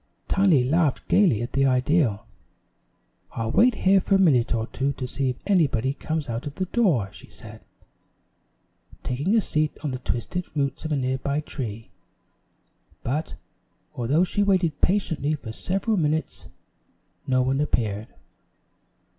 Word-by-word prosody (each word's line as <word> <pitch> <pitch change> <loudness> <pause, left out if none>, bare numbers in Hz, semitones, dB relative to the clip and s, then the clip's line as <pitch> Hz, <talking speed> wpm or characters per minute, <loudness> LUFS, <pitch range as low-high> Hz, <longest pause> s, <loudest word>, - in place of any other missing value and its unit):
Tiny 185 -9 +4
laughed 150 +2 +1
gayly 150 - +4
at 120 - -6
the 135 0 +3
idea. 130 -4 +2 1.1
"I'll 115 0 -2
wait 240 - +4
here 195 0 +5
for 195 - +2
a - - +3
minute 135 -11 +3
or 110 -1 -1
two 135 +4 -2
to 130 -2 -5
see 135 +1 -2
if 125 - -2
anybody 140 - +2
comes 155 0 -3
out 115 +3 -4
of 145 - -7
the 185 - -2
door," 170 - +1
she - - -13
said, - - -12 1.4
taking 145 - 0
a - - +4
seat 155 -4 -1
on 150 - -1
the 130 - -4
twisted 130 +9 -3
roots 140 +2 -2
of 155 - -3
a - - +2
nearby 135 +2 -1
tree; 115 -7 -6 1.1
but, 150 +6 -2 0.6
although 135 +8 +1
she 195 +3 -1
waited 185 -6 +1
patiently 160 -6 +1
for 115 -6 -8
several 195 - -1
minutes, 155 -1 -1 0.8
no 130 -1 +2
one 135 +2 0
appeared. 110 -6 -1
145 Hz, 145 wpm, -24 LUFS, 125-175 Hz, 1.4 s, here